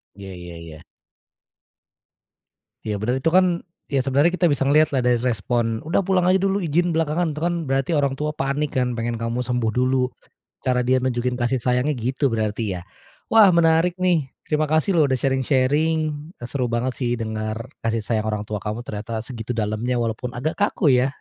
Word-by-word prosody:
Iya 95 -1 -9
iya 90 -1 -9
iya. 80 -2 -10 2.1
Iya 105 -1 -1
bener, 120 +6 -1
itu 150 - -1
kan, 185 +2 +5 0.5
ya 140 - +2
sebenarnya 140 +6 +3
kita 175 - +4
bisa 145 -3 +1
ngelihat 145 +1 +3
lah 130 - +2
dari 120 -1 +3
respon, 115 -1 -1
"Udah 165 +5 +1
pulang 190 -2 +1
aja 185 +1 +4
dulu 195 0 0
izin 170 +2 +1
belakangan," 160 0 0
itu - - -5
kan 175 0 +1
berarti 135 +3 0
orang 140 -3 +1
tua 150 +2 -2
panik 140 0 -2
kan, 125 -1 0
pengen 115 0 -3
kamu 115 +2 -2
sembuh 125 -2 -1
dulu. 125 0 +2 0.6
Cara 125 -1 +1
dia 130 0 +4
nunjukin 125 -1 0
kasih 120 +2 +1
sayangnya 125 +4 +1
gitu 130 +3 0
berarti 110 -2 -1
ya. - - -10 0.5
Wah, 215 -4 +7
menarik 165 +1 +4
nih, 175 -6 +2 0.2
terima 155 0 +1
kasih 155 +5 +2
loh 155 - +6
udah 130 - 0
sharing-sharing 135 +4 +2 0.5
seru 125 0 -2
banget 120 +2 0
sih 120 -2 0
dengar 110 0 -4 0.2
kasih 115 0 0
sayang 110 0 -1
orang 105 -1 -1
tua 105 - -3
kamu 105 +2 -3
ternyata 110 +2 -4
segitu 120 -2 -5
dalamnya 110 +3 -1
walaupun 115 +2 -3
agak 155 +6 -2
kaku 205 -3 0
ya 130 - +2
130 Hz, 180 wpm, -22 LUFS, 115-155 Hz, 2.1 s, Wah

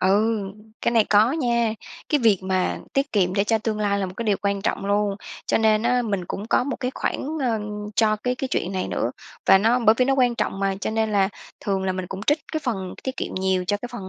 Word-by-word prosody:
Ừ, 210 +4 +3 0.4
cái - - +2
này 225 -2 +5
có 215 +5 +4
nha. 235 -7 +1 0.3
Cái 295 - +3
việc 220 -4 +4
mà 185 -1 0
tiết 275 +1 0
kiệm 185 -3 +2
để 200 - +2
cho 220 +1 +2
tương 215 -1 -2
lai 200 -1 +1
là 195 - -1
một 180 - -7
cái 235 - -3
điều 205 -3 +2
quan 200 -1 0
trọng 195 - -1
luôn, 205 0 +1 0.3
cho - - +2
nên 220 -1 +3
á, 245 +1 +2
mình 200 -5 -2
cũng 200 +4 -5
có - - +3
một 275 - -3
cái 250 0 -1
khoản, - - -2
ơ, 230 -4 0 0.4
cho 215 -2 +3
cái 250 +4 -1
cái 265 +1 -4
chuyện 185 - -1
này 185 -1 -2
nữa. - - -1 0.4
Và 190 - +7
nó 230 +5 +3
bởi 220 -2 +5
vì 255 - +5
nó 270 +1 +2
quan 250 -3 +3
trọng 195 - -2
mà, 195 -1 0
cho - - -2
nên 220 -1 0
là 195 -1 +3 0.3
thường 195 -2 -1
là 185 - 0
mình 185 -1 -4
cũng 195 +1 -6
trích 295 +2 +4
cái 315 - -1
phần 190 -7 -3
tiết 260 0 -4
kiệm - - -4
nhiều 185 -1 0
cho 205 - +1
cái 245 - -7
phần 195 -6 -6
215 Hz, 260 wpm, -23 LUFS, 195-240 Hz, 0.4 s, Và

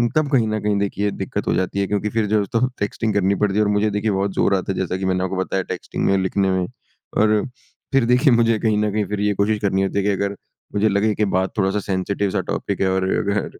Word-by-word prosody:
तब 155 -2 +2
कहीं 120 -5 +3
न 110 0 -1
कहीं 105 -1 +1
देखिए 100 0 -1
दिक्कत - - -4
हो - - +2
जाती 95 +2 -1
है 100 - 0
क्योंकि 105 +1 -1
फिर 110 +1 0
जो 105 -1 +3
तो 115 +5 +1
टेक्स्टिंग 105 +2 -1
करनी 100 0 +2
पड़ती 100 0 0
है 105 - +4
और 105 - +1
मुझे 105 +1 +2
देखिए 105 +1 0
बहुत 95 0 -1
ज़ोर 100 - +3
आता 95 +1 -2
है - - -7
जैसा 95 0 -1
कि 95 - -3
मैंने 95 0 0
आपको 95 +1 -2
बताया 95 0 -1
टेक्स्टिंग - - -4
में 95 0 +3
लिखने 95 +1 +1
में 95 -1 0 0.5
और 105 0 +3 0.5
फिर 135 -3 +4
देखिए 125 +3 +4
मुझे 115 -1 +3
कहीं 110 -2 +1
न 105 0 +1
कहीं 105 0 0
फिर 105 +1 -4
ये 105 0 +2
कोशिश 105 +2 +1
करनी 95 -2 +1
होती 95 - -2
है 100 - +2
कि 105 - +1
अगर 100 +1 -1 0.4
मुझे 105 +1 +2
लगे 105 +2 +2
कि 105 - +1
बात 95 +1 0
थोड़-सा 95 0 +1
सेंसिटिव 100 +1 -1
सा - - 0
टॉपिक - - -2
है 95 - +3
और 95 0 +1
अगर 100 0 0
100 Hz, 260 wpm, -21 LUFS, 95-105 Hz, 0.5 s, है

